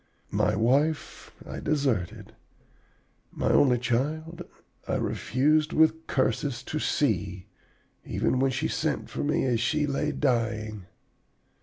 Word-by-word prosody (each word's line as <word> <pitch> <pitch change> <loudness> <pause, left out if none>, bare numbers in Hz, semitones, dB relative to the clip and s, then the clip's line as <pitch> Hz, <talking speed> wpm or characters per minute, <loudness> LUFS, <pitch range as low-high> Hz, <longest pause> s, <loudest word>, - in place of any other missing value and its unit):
My - - +1
wife 140 +8 0 0.2
I - - -6
deserted. 130 - -1 1.0
My - - 0
only 125 -3 +5
child 150 +8 -2 0.5
I - - 0
refused, 150 +5 +1
with 160 +1 +3
curses, 130 0 0
to 155 - -3
see, 100 - 0 0.6
even 130 - 0
when 135 +1 +3
she 140 +5 -1
sent 155 -2 -2
for - - -3
me 150 +1 +1
as 120 -3 +1
she 150 +6 +1
lay 145 +1 -1
dying. 110 -7 -1
135 Hz, 120 wpm, -27 LUFS, 115-150 Hz, 1.0 s, only